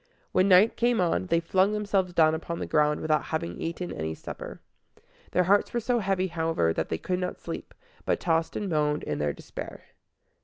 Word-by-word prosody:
When 185 - +3
night 195 +4 +6
came 240 -1 +2
on, 95 - +1
they 165 - +3
flung 190 +4 +2
themselves 200 -3 0
down 160 -2 +4
upon 170 +1 -4
the - - -3
ground 150 -1 +2
without 155 -1 +1
having 90 - -4
eaten 170 +2 -4
any 80 0 -3
supper. - - -8 0.7
Their 180 - +2
hearts 200 +3 +3
were - - +2
so 240 +1 0
heavy, 195 -2 0
however, 160 - 0
that 80 - -2
they 80 - -1
could 180 - -2
not 180 0 -3
sleep, - - -7 0.3
but - - 0
tossed 165 -1 0
and 205 - -2
moaned 150 -3 0
in - - -3
their 75 0 +1
despair. - - -9
170 Hz, 195 wpm, -27 LUFS, 150-190 Hz, 0.7 s, night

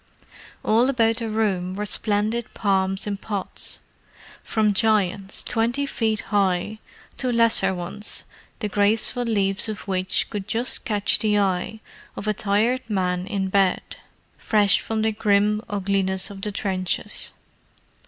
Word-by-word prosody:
All 235 +4 +4
about 225 -4 +2
the 230 -2 -1
room 195 -4 0
were 210 +1 -3
splendid 215 +3 -1
palms 195 -1 +1
in 205 -1 -2
pots; 200 -2 -4 0.6
from 215 -2 +1
giants 200 -2 +1
twenty 240 +4 +1
feet 220 -5 -1
high, 200 +1 +1 0.4
to 255 -2 0
lesser 230 -4 +4
ones 180 +4 -3 0.4
the 210 - 0
graceful 210 +4 +1
leaves 200 -3 0
of 210 -2 -6
which 185 -1 0
could 205 -1 -4
just 235 +4 -1
catch 210 -4 +2
the 210 -2 +2
eye 195 +2 0 0.3
of 210 - -6
a 215 - +2
tired 215 +6 +1
man 180 -2 -1
in 195 -2 -2
bed—fresh 200 +2 +1
from 220 -1 -2
the 220 - +2
grim 210 0 +2
ugliness 195 -2 -1
of 195 -1 -9
the 210 - -2
trenches. 190 +1 -1
205 Hz, 135 wpm, -23 LUFS, 195-220 Hz, 0.6 s, All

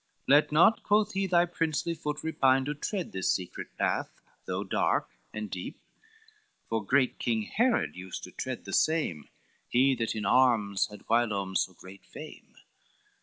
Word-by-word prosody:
"Let 145 +3 +5
not," 175 +9 +5
quoth 210 +1 +2
he, 195 0 0
"thy 175 -1 +4
princely 165 -1 -1
foot 150 -2 -4
repine 135 -4 +2
To 145 - -2
tread 180 +5 -4
this 95 - -1
secret 90 -2 -5
path, - - 0 0.4
though - - -2
dark - - 0 0.2
and 105 0 -5
deep; 90 -2 -7 0.9
For 115 -1 -1
great 130 +5 +2
King 115 -2 0
Herod 235 - +1
used 95 0 -7
to - - -8
tread - - -5
the - - -7
same, 150 - +1 0.4
He 130 +2 +3
that 115 -3 -2
in 105 - -3
arms 115 -6 +3
had 105 - -13
whilom 105 -5 +1
so 95 - +1
great 95 +3 -13
fame. - - -12
130 Hz, 160 wpm, -29 LUFS, 105-160 Hz, 0.9 s, Let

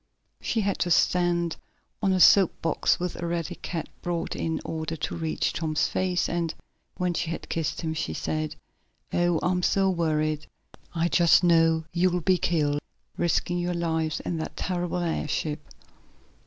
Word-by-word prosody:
She 225 - 0
had 200 -1 -1
to 180 - 0
stand 175 -1 +2 0.4
on 195 -2 +2
a 185 - +2
soap 190 0 +6
box, 165 - +2
which 180 0 -3
Eradicate 170 -1 -3 0.2
brought 175 -1 -2
in 160 0 -2
order 160 0 -3
to 155 - -3
reach 160 -2 -1
Tom's 155 -2 0
face, 180 -1 0
and, 170 -2 -2 0.4
when 180 -1 0
she 170 -1 -2
had 165 - -5
kissed 165 -2 -2
him 160 -2 -2
she 80 - -3
said: 155 - -2 0.6
"Oh, 175 -2 +2
I'm 180 0 +1
so 195 +1 +2
worried! 155 -3 0 0.5
I 165 +1 +2
just 170 0 +5
know 165 -2 +4
you'll 180 0 +2
be 185 +1 +3
killed, 145 -4 +1 0.3
risking 175 +1 0
your 175 0 -1
lives 160 -2 -1
in 170 - -3
that 160 - -5
terrible 180 -1 -2
airship!" 155 -2 -2
170 Hz, 155 wpm, -26 LUFS, 160-175 Hz, 0.6 s, soap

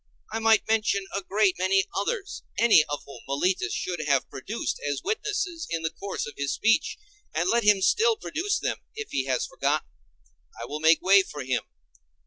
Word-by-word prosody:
I 225 - -1
might 225 -1 +4
mention 215 -3 +1
a 200 - -1
great 195 0 +1
many 190 +1 +3
others, 390 - -2 0.2
any 230 -9 +6
of 145 0 -3
whom 140 - -11
Meletus 160 +7 0
should 175 -2 -3
have 140 -2 +2
produced 200 - -4
as 145 -1 -3
witnesses 405 -6 -2
in 165 -1 -2
the 160 - -1
course 200 +3 -5
of 145 - -8
his 140 -1 -2
speech; 225 +6 +2 0.4
and 170 +3 +1
let 235 +4 +2
him 205 -2 +4
still 455 - +4
produce 400 0 -2
them, - - -2 0.2
if 435 -1 -6
he 130 - -1
has 130 -2 0
forgotten; - - -1 0.7
I 115 - -5
will 150 +5 -5
make 160 +1 +4
way 195 +1 +7
for 150 -6 -7
him. 130 -1 0
195 Hz, 185 wpm, -26 LUFS, 150-230 Hz, 0.7 s, way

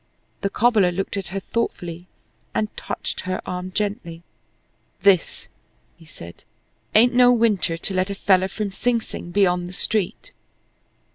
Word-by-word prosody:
The 200 - 0
cobbler 210 -4 +3
looked 195 +3 -3
at 195 -2 -4
her 190 +3 -3
thoughtfully 180 -5 -4 0.5
and 215 -1 -1
touched - - -4
her 185 0 -3
arm 180 +1 -5
gently. 185 -5 -3 0.8
"This," 195 -4 +3 0.5
he 165 - -19
said, 85 - -11 0.5
"ain't 240 +3 +6
no 245 0 +6
winter 215 -8 +2
to 190 - -4
let 185 +1 0
a 200 - -3
feller 190 -1 +3
from 200 +1 -4
Sing 235 +4 +1
Sing 195 - -8
be 195 +2 +3
on 180 -1 0
the 180 - -8
street." 200 0 -1
195 Hz, 150 wpm, -22 LUFS, 180-215 Hz, 0.8 s, ain't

